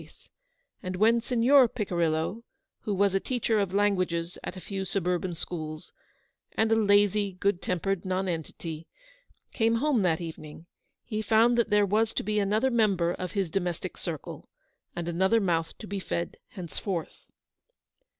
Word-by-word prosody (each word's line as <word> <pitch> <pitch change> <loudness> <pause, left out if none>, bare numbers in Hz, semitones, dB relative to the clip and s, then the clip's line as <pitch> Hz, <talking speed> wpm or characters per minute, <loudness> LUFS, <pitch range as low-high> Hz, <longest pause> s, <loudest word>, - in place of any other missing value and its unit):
face, - - -19 0.5
and 185 -2 -4
when 225 +5 +4
Signor 250 +2 +5
Picirillo 170 -1 -1 0.2
— - - -57
who 210 - 0
was 200 0 +3
a 195 - +3
teacher 230 -1 0
of 200 -2 +1
194 190 -3 +1
languages 170 +1 -5
at 180 - -6
a 185 - -11
few 195 -1 -3
suburban 180 -2 -1
schools, 155 -2 -6 0.6
and 220 0 +1
a - - +6
lazy, 205 -1 +3
good 190 0 0
tempered 180 +1 -1
nonentity 170 -3 -3 0.3
— - - -37
came 225 0 +2
home 265 -1 +2
that 170 -4 +2
even 165 -3 -7
ing, 155 +2 -12 0.4
he 215 -2 -3
found 225 +3 +4
that 235 -2 +2
there 210 -1 +4
was 220 +3 +1
to - - -1
be 210 +1 0
another 215 +6 +2
member 200 -7 +2
of 180 -1 -5
his 195 -6 -1
domestic 180 -1 -2
circle, 160 -5 -6 0.5
and 170 -1 -4
another 190 +6 +3
mouth 165 -5 -1
to - - -9
be 200 -1 -4
fed 170 -2 -3
henceforth. 180 -1 -5
195 Hz, 165 wpm, -28 LUFS, 175-215 Hz, 0.6 s, a